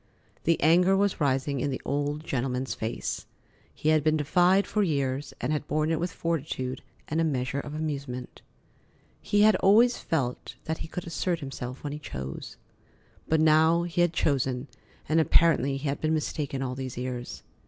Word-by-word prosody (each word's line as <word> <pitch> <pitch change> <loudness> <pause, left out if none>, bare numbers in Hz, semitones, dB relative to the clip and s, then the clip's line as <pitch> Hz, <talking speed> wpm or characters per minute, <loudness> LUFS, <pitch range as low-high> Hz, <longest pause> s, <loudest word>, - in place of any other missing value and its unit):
The 165 0 +3
anger 180 +4 +5
was 200 -4 +1
rising 135 0 +1
in 140 - 0
the 130 - -3
old 145 +2 -1
gentleman's 130 -2 -2
face. 110 +1 -4 0.4
He 155 - -1
had 155 -2 +4
been 155 0 +3
defied 180 +6 +3
for 215 - 0
years 140 -6 -1
and 155 - -1
had 150 0 -2
borne 155 +1 0
it 160 - +1
with 175 +1 -2
fortitude 140 -7 -3 0.3
and 160 +2 0
a - - +3
measure 135 -3 -1
of 145 +1 -6
amusement. 140 -5 -5 0.8
He 205 - +2
had 215 -1 +6
always 225 +6 +5
felt 130 -6 -2
that 160 0 -3
he - - -5
could 180 +2 -6
assert 170 0 -1
himself 130 -3 -6
when 145 -1 -4
he 150 - -5
chose. 65 - -7 0.7
But 160 0 +2
now 160 +2 +5
he 175 0 -1
had 175 -1 +3
chosen, 135 -4 0 0.4
and 155 +2 +3
apparently 155 -4 +3
he 140 +2 -4
had 140 - -2
been 155 0 +1
mistaken 145 -3 -2
all 125 -1 -2
these 130 -1 -6
years. 125 -1 -5
150 Hz, 175 wpm, -27 LUFS, 135-165 Hz, 0.8 s, had